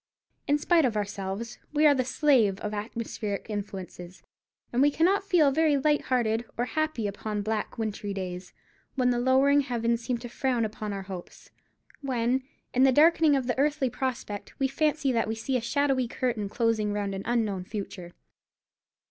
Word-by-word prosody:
In 290 - +3
spite 330 +2 +3
of 235 -5 +1
ourselves, 200 +2 -4
we 300 +1 +3
are 295 - +7
the 260 -2 +1
slaves 250 -7 +3
of 210 0 -3
atmospheric 210 -1 -4
influences; 190 -3 -7 0.5
and 245 - +2
we 290 - +6
cannot 355 +7 +2
feel 350 -8 +4
very 305 0 +3
light 295 +1 +1
hearted 235 -3 +1
or 240 - +1
happy 310 -5 -1
upon 205 +1 -3
black 215 0 -3
wintry 215 -2 -3
days, 185 -2 -5 0.4
when 250 -2 +2
the 240 - 0
lowering 265 +3 +4
heavens 235 -3 -1
seem 245 0 -1
to 240 - -8
frown 245 -1 0
upon 215 0 -5
our 195 -1 -4
hopes; 185 -2 -10 0.5
when, 255 -1 0 0.3
in 255 - +2
the 265 0 +6
darkening 315 +1 +5
of 265 -2 0
the 245 +1 -1
earthly 280 -3 +1
prospect, 240 -6 -4
we 270 - +1
fancy 285 0 +1
that 230 -3 +1
we 220 - -2
see 255 +4 -2
a 250 - +1
shadowy 265 +1 +1
curtain 235 -5 -2
closing 220 -2 0
round 200 -1 -2
an 195 - -4
unknown 220 -6 0
future. 185 -3 -7
240 Hz, 175 wpm, -27 LUFS, 210-275 Hz, 0.5 s, are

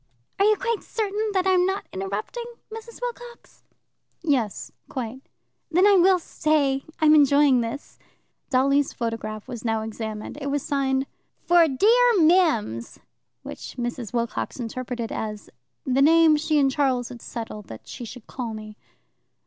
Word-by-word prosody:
"Are 395 - +4
you 430 0 +5
quite 465 -1 -2
certain 430 0 -2
that 375 -1 +1
I'm 370 -1 +4
not 385 +2 -1
interrupting, 200 - -4 0.3
Mrs. 450 +1 -9
Wilcox?" 485 0 -8 0.6
"Yes, 255 -10 -1 0.2
quite." 255 -1 -5 0.5
"Then 360 +4 +4
I 410 - +7
will 375 0 +5
stay. 295 -5 0 0.2
I'm 310 -1 +5
enjoying 285 -3 +5
this." 230 +5 -6 0.5
Dolly's 275 +1 +2
photograph 225 -2 -4
was 240 -3 -7
now 225 -2 0
examined. 220 +3 -6
It 280 - -3
was 285 0 -1
signed 270 -1 0 0.4
"For 345 -1 +5
dear 465 - +4
Mims," 310 - +2 0.5
which - - -8
Mrs. 240 -2 -4
Wilcox 235 +1 -3
interpreted 240 0 -4
as 210 -1 -5 0.3
"the 265 0 +2
name 320 +1 +6
she 305 0 +1
and 275 -2 +3
Charles 260 -4 0
had 240 -2 -10
settled 215 -3 -7
that 110 - -11
she 250 - -8
should 235 0 -9
call 235 -4 -5
me." 215 0 -9
275 Hz, 145 wpm, -24 LUFS, 230-345 Hz, 0.6 s, I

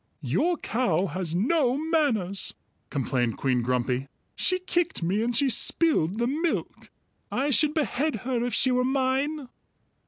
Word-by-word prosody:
"Your 295 - +1
cow 195 - 0
has 175 -2 -3
no 255 - +2
manners," 285 - 0 0.3
complained 125 -3 -1
Queen 130 -3 +1
Grumpy. 125 +2 -1 0.3
"She 370 - +1
kicked 350 - -1
me, 190 +6 +1
and 235 +1 0
she 275 +3 +3
spilled 245 - +2
the 235 - +1
milk. 315 +7 -2 0.4
I 280 +3 0
should 300 +3 +2
behead 300 -1 0
her 250 -2 0
if 245 -2 -1
she 260 - +3
were 250 0 +2
mine." 270 +2 0
250 Hz, 145 wpm, -26 LUFS, 180-295 Hz, 0.4 s, she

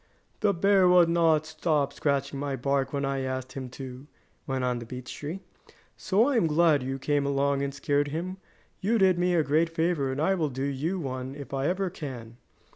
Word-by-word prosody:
"The 210 -2 +3
bear 195 +1 +4
would 180 -2 +6
not 165 -2 +3
stop 155 -2 0
scratching 140 -1 -1
my 140 -1 -2
bark 135 +1 0
when 140 -1 -1
I 135 0 -1
asked 130 -1 -4
him 130 -2 -6
to," 130 +1 -8 0.4
went 135 -2 -1
on 125 -1 0
the 120 - -8
beech 125 0 -7
tree, 160 +6 -6 0.5
"so 210 +6 +2
I 280 -4 +2
am 200 - +3
glad 155 -2 +3
you 135 +1 -3
came 145 +1 0
along, 140 0 +1
and 140 0 -1
scared 145 +1 0
him. 175 +6 -4 0.4
You 215 +5 +1
did 190 -3 +4
me 180 0 +2
a 165 - +3
great 155 +3 +2
favor 165 -4 0
and 130 - -4
I 165 +6 +2
will 165 -5 0
do 130 0 -4
you 145 +7 -2
one 130 -2 -5
if 140 -2 -9
I 135 +1 0
ever 185 0 -1
can." 120 -7 -8
145 Hz, 205 wpm, -27 LUFS, 135-170 Hz, 0.5 s, would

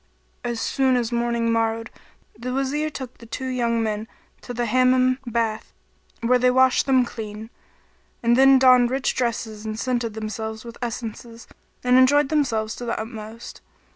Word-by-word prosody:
As 240 -1 -3
soon 260 +2 +1
as 240 -1 -1
morning 235 -1 0
morrowed 225 0 -1 0.4
the 245 +3 -5
Wazir 275 +4 -1
took 260 -4 -8
the 230 - -13
two 260 +3 -5
young 235 -3 0
men 215 0 -3 0.3
to - - -8
the 240 0 -2
Hammam 255 +2 +3
bath 225 -2 -2 0.5
where 250 +2 +3
they 250 +1 +4
washed 260 +1 +3
them 260 -2 +4
clean; 220 -1 -8 0.7
and 235 0 +4
they 270 +1 +7
donned 255 -2 +6
rich 265 +1 0
dresses 225 -3 -3
and 215 0 -5
scented 240 -3 -2
themselves 220 +1 -5
with 235 0 -10
essences 230 0 -6 0.4
and 250 0 +5
enjoyed 280 +2 +4
themselves 225 -8 0
to 245 - -6
the 230 - -2
utmost. 220 0 -8
235 Hz, 160 wpm, -23 LUFS, 225-255 Hz, 0.7 s, they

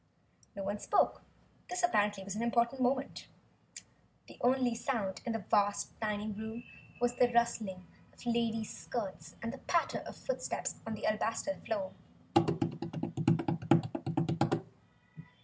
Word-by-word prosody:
No 200 - -3
one 200 +2 -1
spoke. 410 - +3 0.5
This, 360 0 -2
apparently 205 - +3
was 195 +1 -4
an 220 - -2
important 235 +2 +2
moment. 265 +2 0 1.0
The - - -14
only 250 -1 +4
sound 225 -5 -1
in 235 - 0
the 220 -5 -3
vast 205 0 +3
dining 210 -1 -1
room 220 +2 -5 0.4
was 245 0 +2
the 245 -1 +5
rustling 215 -6 +1 0.3
of - - -26
the 240 - -1
ladies' 225 -2 0
skirts 190 +5 -5
and 230 +1 -2
the 270 - -7
patter 340 -1 +1
of - - -7
footsteps - - -2
on 220 - -1
the - - -4
alabaster 225 +6 +1
floor. 200 -4 -1
225 Hz, 130 wpm, -34 LUFS, 205-245 Hz, 1.0 s, the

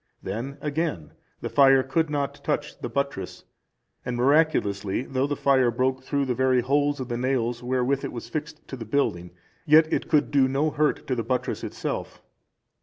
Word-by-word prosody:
Then 120 +8 -5
again, 150 - -2 0.3
the - - -3
fire 135 -2 +5
could 160 +4 0
not 140 -1 -3
touch 150 0 -2
the 120 - -5
buttress; 135 -7 -3 0.6
and, 125 -1 -3
miraculously, 120 -8 +2
though 135 +1 -1
the 145 - -1
fire 130 -4 +3
broke 130 +2 0
through 140 +1 -1
the 130 - 0
very 130 0 +2
holes 145 +3 +1
of 130 - -4
the 120 -1 -3
nails 120 -2 -1
wherewith 130 +2 0
it - - -3
was 120 - -7
fixed 155 0 -6
to - - -5
the 120 - -7
building, 95 -8 -1 0.4
yet 155 +1 +6
it - - -1
could 150 -2 +2
do 135 -2 +4
no 140 +4 0
hurt 150 +1 0
to 130 - -1
the 120 - -1
buttress 125 +3 -2
itself. - - -4
135 Hz, 185 wpm, -25 LUFS, 125-145 Hz, 0.6 s, yet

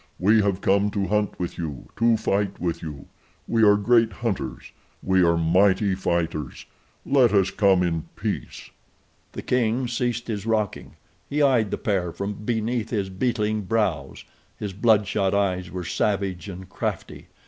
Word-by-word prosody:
We 105 +4 +4
have 100 -1 0
come 100 +1 +2
to 100 -1 -1
hunt 105 0 -1
with 90 -1 -4
you, 75 -7 -5
to 115 0 +3
fight 100 -1 -1
with 85 -2 -2
you. 75 -4 -7 0.4
We 115 - +1
are 105 -1 +7
great 115 +2 +3
hunters. 95 - -4 0.3
We 95 0 +3
are 85 -1 +3
mighty 95 +4 +3
fighters. 85 -6 -2 0.4
Let 130 -5 +4
us 95 -2 +3
come 95 -3 +3
in 85 -2 -1
peace." - - -5 0.6
The - - -6
king 125 0 +1
ceased 120 0 -2
his 105 -2 -4
rocking. 110 -2 -2 0.3
He 145 +1 +1
eyed 125 -7 +3
the - - -2
pair 95 -5 -1
from 100 +4 -4
beneath 115 +1 -2
his 100 -4 -2
beetling 110 0 -1
brows. 110 +1 -1 0.3
His 100 -2 -5
bloodshot 100 -2 +2
eyes 95 -3 0
were 90 -1 -5
savage 100 0 -1
and 95 0 -8
crafty. - - -5
100 Hz, 155 wpm, -24 LUFS, 95-110 Hz, 0.6 s, are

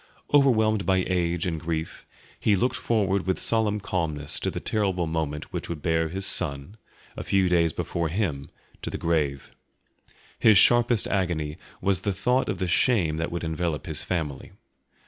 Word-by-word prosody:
Overwhelmed 110 -7 +4
by 95 -1 +2
age 85 -2 0
and 85 -3 -2
grief, 80 0 -4 0.3
he 105 - +3
looked 125 +7 +1
forward 100 -4 0
with 95 - 0
solemn 110 -2 +1
calmness 80 -7 -3
to - - -1
the - - -4
terrible 95 -5 0
moment 80 -2 -3
which - - -4
would 80 -4 -5
bear 80 -1 +1
his 95 +4 -4
son, 80 -1 -1 0.4
a - - -5
few 95 -1 +2
days 85 -2 +3
before 85 +2 -2
him, 75 -7 -2 0.3
to - - -4
the - - -4
grave. 75 -5 -1 0.9
His 110 -3 +6
sharpest 120 +1 +4
agony 85 -5 -1 0.2
was 95 -2 +1
the 100 - -1
thought 125 +7 +1
of 100 - -1
the 95 - -2
shame 85 -4 +2
that 80 +1 -2
would 85 0 -4
envelop 80 -3 -2
his - - -4
family. 80 -7 -4
90 Hz, 165 wpm, -26 LUFS, 80-100 Hz, 0.9 s, His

